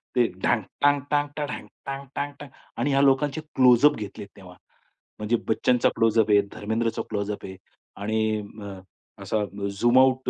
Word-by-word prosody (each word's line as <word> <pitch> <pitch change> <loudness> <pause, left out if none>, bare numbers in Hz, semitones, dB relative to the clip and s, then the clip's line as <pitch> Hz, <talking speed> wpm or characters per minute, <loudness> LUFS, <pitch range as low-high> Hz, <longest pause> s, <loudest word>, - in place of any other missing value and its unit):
ते 120 -2 +4 0.2
ढांग, 120 -3 +2 0.2
टांग-टांग, 145 +1 +2
टांग, 145 -1 -2
ढांग, - - -6 0.2
टांग-टांग, 140 +1 -5
टांग 145 -2 -9 0.3
आणि 135 +4 0
ह्या 135 0 +3
लोकांचे 140 +3 +2
क्लोजअप 130 +3 +6
घेतले 105 -1 -7
तेव्हा. 90 -2 -13 0.6
म्हणजे 105 +3 0
बच्चनचा 125 +2 +3
क्लोजअप 110 -1 +3
आहे, 100 0 +6
धर्मेंद्रचा 110 +2 -2
क्लोजअप 105 -1 -3
आहे 95 -1 -9 0.5
आणि 110 0 0 0.2
अ, 100 -2 -8 0.4
असा 110 -1 -1 0.3
झूम 120 +6 +3
आउट 130 -1 +3
120 Hz, 145 wpm, -25 LUFS, 105-135 Hz, 0.6 s, क्लोजअप